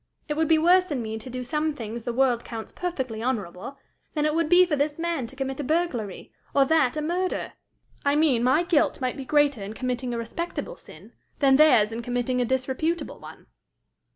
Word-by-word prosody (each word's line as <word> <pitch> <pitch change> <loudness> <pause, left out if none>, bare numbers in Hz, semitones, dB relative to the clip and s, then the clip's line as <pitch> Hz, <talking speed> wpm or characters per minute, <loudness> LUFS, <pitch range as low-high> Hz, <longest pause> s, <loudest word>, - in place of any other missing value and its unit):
It 300 - -1
would 320 +1 +1
be 320 - +5
worse 360 +3 +4
in 265 -6 -2
me 220 0 -4
to 240 - -10
do 250 0 -5
some 300 +4 -1
things 230 -2 -6
the 240 - -1
world 245 -1 +2
counts 225 -2 -7
perfectly 260 -11 -4
honorable, 230 0 -3 0.4
than 300 -1 +1
it 305 - +1
would 330 -1 0
be 360 +1 +7
for 330 -4 0
this 290 +1 -1
man 335 -7 -2
to 270 - -13
commit 270 0 -4
a - - -2
burglary, 270 - -2 0.2
or 275 -1 +5
that 310 -3 +2
a 305 - -1
murder. 360 +4 -2 0.5
I 285 0 +2
mean 295 -6 +3
my 260 +7 +3
guilt 320 -4 +2
might 255 -2 -2
be 270 - -7
greater 290 -5 +2
in 200 +2 -6
committing 250 0 -2
a 235 - -2
respectable 340 - -5
sin, - - -15 0.2
than 270 -2 +4
theirs 245 -9 +5
in 230 +1 -4
committing 245 +1 -1
a - - +1
disreputable 260 +7 -2
one." - - -12
270 Hz, 210 wpm, -25 LUFS, 245-315 Hz, 0.5 s, be